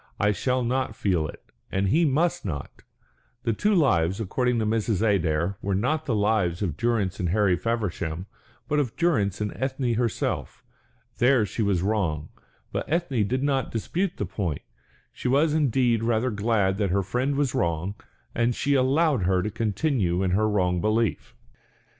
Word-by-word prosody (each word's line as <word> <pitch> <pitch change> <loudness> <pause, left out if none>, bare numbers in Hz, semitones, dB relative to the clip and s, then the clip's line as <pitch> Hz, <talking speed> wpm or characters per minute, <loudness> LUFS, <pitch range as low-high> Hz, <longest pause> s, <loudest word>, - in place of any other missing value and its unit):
"I 105 +1 +3
shall 125 +6 0
not 125 -2 -1
feel 90 -8 0
it, - - -11 0.3
and 95 0 0
he 165 - +3
must 160 +4 +1
not." 75 -8 -6 0.6
The 115 -2 +1
two 205 - +1
lives, 95 - +2
according 125 +4 0
to 110 - 0
Mrs. 110 -1 0
Adair, 90 -1 0
were 100 -1 -1
not 155 +10 0
the 120 - +1
lives 105 -4 +1
of 85 -7 -2
Durrance 110 -5 0
and 90 - 0
Harry 100 -1 +3
Feversham, 90 -5 -2 0.4
but 150 - +1
of 130 -6 -1
Durrance 105 - +1
and 105 -1 -2
Ethne 130 -2 -1
herself. 115 -1 -2 0.6
There 125 -2 +4
she 110 - -4
was 100 -4 +1
wrong; 90 -8 -1 0.4
but - - -4
Ethne 140 - +1
did 130 +4 -1
not 135 -3 0
dispute 170 - -2
the 105 - -2
point, 90 -5 -3 0.5
she - - -4
was 145 +4 +3
indeed 130 -6 +2
rather 115 +2 +1
glad 100 -2 +1
that 100 -2 +1
her 100 +2 +1
friend 130 +8 -1
was 140 -3 0
wrong, 85 +3 -1 0.4
and 120 0 +1
she 145 - 0
allowed 140 0 +3
her 90 -1 +2
to 105 - -2
continue 105 - 0
in 95 - +1
her 110 +3 +2
wrong 90 -4 +1
belief. 110 - 0
110 Hz, 170 wpm, -25 LUFS, 95-130 Hz, 0.6 s, There